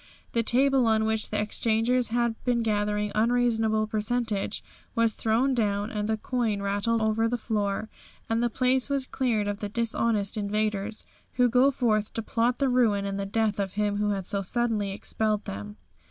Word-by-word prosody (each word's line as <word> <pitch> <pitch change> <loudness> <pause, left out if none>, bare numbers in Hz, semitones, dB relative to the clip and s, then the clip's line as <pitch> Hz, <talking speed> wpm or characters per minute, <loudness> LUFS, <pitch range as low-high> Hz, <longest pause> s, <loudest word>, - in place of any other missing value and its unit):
The 230 - +2
table 260 +2 +3
on 220 -1 +3
which 220 -1 0
the 210 - -1
exchangers 225 +3 +1
had 235 0 +1
been 240 -2 +1
gathering 210 -1 0
unreasonable 225 -1 +2
percentage 215 -1 -2 0.3
was 230 -2 +2
thrown 235 +6 +1
down, 205 -3 0
and 210 0 -2
the 220 - +1
coin 225 -3 -1
rattled 205 +3 0
over 220 +1 +2
the 245 +1 -1
floor, 215 -2 -2 0.4
and 225 +1 0
the 240 - +2
place 255 +2 +1
was 275 -2 0
cleared 235 -6 0
of 205 0 -3
the 205 - -4
dishonest 225 -2 0
invaders, 210 0 -2 0.3
who 250 0 +3
go 250 +3 +4
forth 220 -5 0
to 225 - -2
plot 235 +3 0
the 275 - +1
ruin 230 -6 +2
and 200 0 -3
the 195 - -3
death 215 0 0
of 195 -2 -2
Him 205 0 0
who 210 0 0
had 195 -2 -2
so 200 +1 -1
suddenly 220 0 0
expelled 210 +1 -1
them. 105 +2 -7
220 Hz, 180 wpm, -27 LUFS, 205-240 Hz, 0.4 s, go